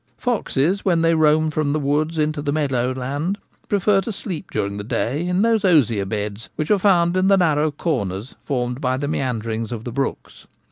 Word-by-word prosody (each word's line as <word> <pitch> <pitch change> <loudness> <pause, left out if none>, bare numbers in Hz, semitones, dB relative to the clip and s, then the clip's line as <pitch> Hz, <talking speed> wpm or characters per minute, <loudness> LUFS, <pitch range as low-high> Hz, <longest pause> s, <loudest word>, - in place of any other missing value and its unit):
Foxes, 200 - 0
when 170 -4 +2
they 165 0 +4
roam 155 0 +3
from 155 -2 0
the 155 - 0
woods 150 +3 0
into 155 -1 0
the 145 -1 -1
meadow 135 -5 0
land, 140 +9 -2 0.3
prefer 200 0 +3
to 210 - -4
sleep 190 -5 -5
during 100 -1 -2
the 105 - -5
day 140 +9 -1
in 180 +3 +1
those 225 -2 +2
osier 125 - +3
beds 105 +1 -4
which 155 +3 -2
are 205 - +4
found 175 -3 +3
in 185 +1 +2
the 195 0 +5
narrow 155 -4 +2
corners 125 - -3
formed 125 -1 -2
by 130 -1 0
the 145 +2 -2
meanderings 115 -5 -2
of 115 -2 -5
the 120 - -5
brooks. 135 +3 -4
150 Hz, 195 wpm, -21 LUFS, 125-175 Hz, 0.3 s, the